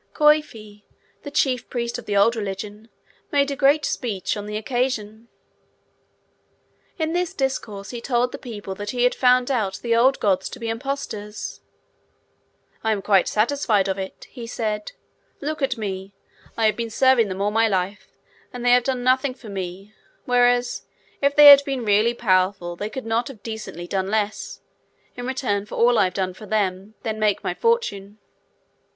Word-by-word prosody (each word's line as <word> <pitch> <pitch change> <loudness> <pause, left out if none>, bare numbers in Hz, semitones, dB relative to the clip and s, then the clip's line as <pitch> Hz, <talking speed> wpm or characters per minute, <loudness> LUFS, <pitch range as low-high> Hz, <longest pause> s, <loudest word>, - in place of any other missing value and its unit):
Coifi, 300 -9 +1 0.4
the 285 - -7
chief 265 -3 0
priest 235 -1 -3
of - - -13
the 205 -1 0
old 230 +4 +4
religion, 210 +1 -6 0.4
made 280 -1 +2
a - - -2
great 285 +1 +3
speech 215 -7 -2
on 205 0 -6
the 210 0 -3
occasion. 230 -2 -2 1.7
In 320 -1 -1
this 355 -1 -1
discourse, 215 -7 -3
he 240 -2 -6
told 245 0 0
the - - -7
people 205 -5 -7
that 205 +2 -6
he 245 +2 0
had 250 - +4
found 250 0 +3
out 210 -7 0
the 230 -1 +2
old 260 +4 +4
gods 195 -3 +1
to 255 - -10
be 230 -1 -4
impostors. 225 -5 -5 1.2
'I 220 - +1
am 205 - -3
quite 195 -3 +3
satisfied 215 -3 +1
of 190 0 -2
it,' 190 0 -7
he 240 -3 -8
said. 215 -3 -3 0.5
'Look 305 +1 -4
at 265 -2 0
me! 195 -2 -5 0.4
I 225 - +2
have 215 -1 +3
been 230 0 -3
serving 255 -1 +4
them 190 0 -5
all 205 +1 +1
my 225 +1 +3
life, 195 0 -2 0.4
and 245 -1 -6
they 245 - +5
have 245 -1 +5
done 255 -2 -1
nothing 255 +1 +2
for 230 - -12
me; 195 +1 -6 0.3
whereas, 245 0 +2 0.4
if 280 0 +2
they 295 - +8
had 280 -1 +11
been 270 -4 -3
really 215 +3 +3
powerful, 185 -5 +1
they 205 +4 -4
could 260 +3 -6
not 225 +1 0
have 250 -7 -11
decently 220 -6 -6
done 190 +1 -2
less, 215 0 -2 0.5
in 245 0 -6
return 210 -6 -1
for - - -7
all 240 0 +4
I - - +5
have 185 0 -3
done 185 -1 -1
for 210 +3 -12
them, 200 0 -1
than 220 -1 -3
make 210 -2 +1
my - - -1
fortune. 210 - -1
225 Hz, 180 wpm, -23 LUFS, 205-255 Hz, 1.7 s, had